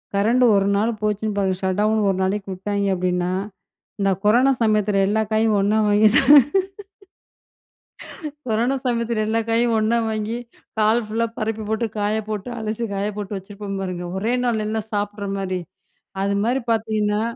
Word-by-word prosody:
Current 230 Hz, +5 st, +3 dB
ஒரு 195 Hz, 0 st, +2 dB
நாள் 220 Hz, +4 st, +1 dB
போச்சுன்னு 210 Hz, 0 st, -1 dB
பாருங்க 190 Hz, -2 st, 0 dB
ஷட்டவுன் 210 Hz, +3 st, +1 dB
ஒரு 190 Hz, -, 0 dB
நாளைக்கு 195 Hz, +1 st, -1 dB
விட்டாய்ங்க 200 Hz, +1 st, -2 dB
அப்படீன்னா 180 Hz, 0 st, -1 dB, 0.7 s
இந்த 195 Hz, -1 st, +2 dB
கொரோனா 240 Hz, +6 st, +4 dB
சமயத்தில 210 Hz, -2 st, +2 dB
எல்லா 215 Hz, +2 st, +1 dB
காயும் 220 Hz, 0 st, +2 dB
ஒண்ணா 205 Hz, +2 st, +2 dB
வாங்கி 205 Hz, +1 st, +4 dB
ச -, -, +7 dB, 2.3 s
கொரோனா 235 Hz, +4 st, +1 dB
சமயத்தில 235 Hz, -2 st, 0 dB
எல்லா 225 Hz, +1 st, +1 dB
காயையும் 230 Hz, 0 st, +2 dB
ஒண்ணா 220 Hz, +2 st, +2 dB
வாங்கி, 220 Hz, +1 st, -2 dB, 0.4 s
ஹால் 220 Hz, +2 st, +3 dB
ஃபுல்லா 225 Hz, +2 st, 0 dB
பரப்பி 220 Hz, 0 st, -2 dB
போட்டு, 220 Hz, +1 st, 0 dB
காய 205 Hz, +1 st, 0 dB
போட்டு 210 Hz, +1 st, -4 dB
அலசி 220 Hz, +1 st, -3 dB
காய 200 Hz, +1 st, -1 dB
போட்டு 205 Hz, 0 st, -4 dB
வச்சிருப்போம் 195 Hz, 0 st, -7 dB
பாருங்க. 180 Hz, -2 st, -4 dB
ஒரே 220 Hz, +5 st, 0 dB
நாள் 230 Hz, -3 st, 0 dB
எல்லாம் 220 Hz, 0 st, -3 dB
சாப்பிடுற 205 Hz, 0 st, -2 dB
மாரி. 185 Hz, -1 st, -2 dB, 0.6 s
அது 200 Hz, +1 st, 0 dB
மாரி 250 Hz, +4 st, +1 dB
பார்த்தீங்கன்னா, 215 Hz, -1 st, 0 dB
210 Hz, 150 wpm, -22 LUFS, 200-220 Hz, 2.3 s, ச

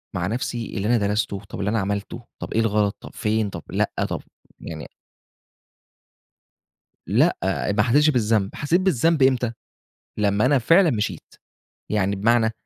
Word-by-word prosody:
مع 90 Hz, 0 st, -1 dB
نفسي 115 Hz, 0 st, -3 dB
اللي 100 Hz, +2 st, -1 dB
أنا 120 Hz, 0 st, +3 dB
درَسته، 100 Hz, -1 st, -1 dB
طَب -, -, -7 dB
اللي 100 Hz, +1 st, -1 dB
أنا 115 Hz, +1 st, +1 dB
عملته، 100 Hz, +4 st, -3 dB, 0.2 s
طَب -, -, -5 dB
إيه 115 Hz, -, +2 dB
الغلط، 105 Hz, -2 st, +1 dB
طَب -, -, -10 dB
فين، 110 Hz, -1 st, 0 dB
طَب -, -, -8 dB
لأ، -, -, 0 dB, 0.2 s
طَب -, -, -3 dB, 0.4 s
يعني 80 Hz, -2 st, -7 dB, 2.2 s
لأ، -, -, +3 dB, 0.3 s
أ -, -, +1 dB
ما 105 Hz, +1 st, +2 dB
حسّتش 145 Hz, +6 st, +4 dB
بالذنب، 110 Hz, -5 st, +1 dB
حسّيت 165 Hz, +6 st, +1 dB
بالذنب 165 Hz, -4 st, +2 dB
إمتى، 125 Hz, -3 st, +3 dB, 0.7 s
لمّا 105 Hz, +3 st, +2 dB
أنا 140 Hz, 0 st, +4 dB
فعلًا 165 Hz, -, +4 dB
مشيت، 105 Hz, -2 st, -3 dB, 0.6 s
يعني 100 Hz, -1 st, 0 dB
بمعنى، 110 Hz, +2 st, +3 dB
110 Hz, 150 wpm, -23 LUFS, 100-125 Hz, 2.2 s, حسّتش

